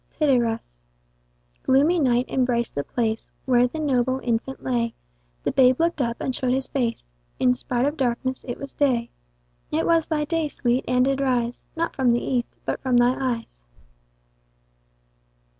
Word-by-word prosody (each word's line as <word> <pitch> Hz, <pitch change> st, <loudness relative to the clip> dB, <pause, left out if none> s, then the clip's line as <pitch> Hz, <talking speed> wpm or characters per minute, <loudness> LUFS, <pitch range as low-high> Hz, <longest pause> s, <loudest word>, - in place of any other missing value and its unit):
Tityrus. 235 Hz, -, 0 dB, 0.8 s
Gloomy 295 Hz, +7 st, +3 dB
night 250 Hz, -3 st, +2 dB
embrac'd 245 Hz, -2 st, 0 dB
the 145 Hz, -, -2 dB
place 225 Hz, -, -2 dB, 0.2 s
Where 250 Hz, -2 st, +4 dB
the 285 Hz, -, -7 dB
noble 260 Hz, -4 st, +1 dB
infant 240 Hz, +3 st, -2 dB
lay: 235 Hz, -3 st, -1 dB, 0.5 s
The -, -, 0 dB
babe 255 Hz, -1 st, +4 dB
looked 335 Hz, -3 st, +1 dB
up, 235 Hz, -2 st, -1 dB
and 260 Hz, -, -2 dB
show'd 250 Hz, 0 st, 0 dB
his 265 Hz, 0 st, 0 dB
face, 240 Hz, -5 st, -1 dB, 0.4 s
In 250 Hz, -1 st, +4 dB
spite 245 Hz, 0 st, -1 dB
of 295 Hz, +2 st, -1 dB
darkness 260 Hz, 0 st, -1 dB
it 245 Hz, -, -4 dB
was 275 Hz, -, -7 dB
day. 245 Hz, -5 st, +1 dB, 0.6 s
It 320 Hz, +2 st, 0 dB
was 330 Hz, -2 st, +3 dB
thy 300 Hz, -2 st, 0 dB
day, 325 Hz, 0 st, 0 dB
Sweet, 250 Hz, -3 st, 0 dB
and 250 Hz, 0 st, +3 dB
did 275 Hz, 0 st, 0 dB
rise, 245 Hz, -3 st, 0 dB
Not 335 Hz, +1 st, -2 dB
from 255 Hz, -3 st, +3 dB
the 240 Hz, -, +2 dB
east, 245 Hz, -2 st, -2 dB
but -, -, -2 dB
from 255 Hz, -2 st, +2 dB
thy 240 Hz, +1 st, +5 dB
eyes. 235 Hz, -, -4 dB
255 Hz, 160 wpm, -24 LUFS, 240-275 Hz, 0.8 s, thy